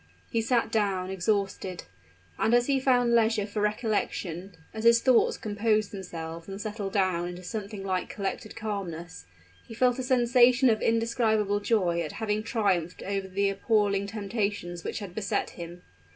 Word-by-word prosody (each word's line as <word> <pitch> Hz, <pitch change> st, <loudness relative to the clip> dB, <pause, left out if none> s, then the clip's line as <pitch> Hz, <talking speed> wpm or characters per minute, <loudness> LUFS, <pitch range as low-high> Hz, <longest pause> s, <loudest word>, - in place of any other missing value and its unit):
He 230 Hz, -, +1 dB
sat 230 Hz, 0 st, +1 dB
down, 195 Hz, -4 st, 0 dB
exhausted; 190 Hz, -1 st, -1 dB, 0.6 s
and 230 Hz, -, +3 dB
as 240 Hz, 0 st, +4 dB
he 275 Hz, 0 st, +2 dB
found 245 Hz, -2 st, +3 dB
leisure 225 Hz, -2 st, +3 dB
for 210 Hz, 0 st, -3 dB
recollection 205 Hz, -4 st, -2 dB, 0.2 s
as 220 Hz, -, -5 dB
his 230 Hz, 0 st, +6 dB
thoughts 250 Hz, 0 st, +3 dB
composed 215 Hz, 0 st, 0 dB
themselves 165 Hz, -4 st, -7 dB
and 195 Hz, 0 st, -6 dB
settled 205 Hz, -2 st, -4 dB
down 185 Hz, -3 st, +1 dB
into 180 Hz, +1 st, -7 dB
something 200 Hz, +1 st, -5 dB
like 185 Hz, -2 st, -2 dB
collected 200 Hz, +1 st, -4 dB
calmness 175 Hz, -, -5 dB, 0.4 s
he 225 Hz, -, -9 dB
felt 250 Hz, +2 st, +2 dB
a -, -, 0 dB
sensation 250 Hz, 0 st, +4 dB
of 220 Hz, -, 0 dB
indescribable 225 Hz, -3 st, +1 dB
joy 185 Hz, -6 st, +1 dB
at 155 Hz, -, -4 dB
having 215 Hz, -1 st, -1 dB
triumphed 195 Hz, -7 st, 0 dB
over 195 Hz, -1 st, -2 dB
the 195 Hz, +1 st, +1 dB
appalling 200 Hz, -1 st, +1 dB
temptations 200 Hz, -4 st, -3 dB
which -, -, -4 dB
had 200 Hz, -5 st, -6 dB
beset 200 Hz, 0 st, -1 dB
him. 175 Hz, 0 st, -9 dB
205 Hz, 155 wpm, -28 LUFS, 190-225 Hz, 0.6 s, his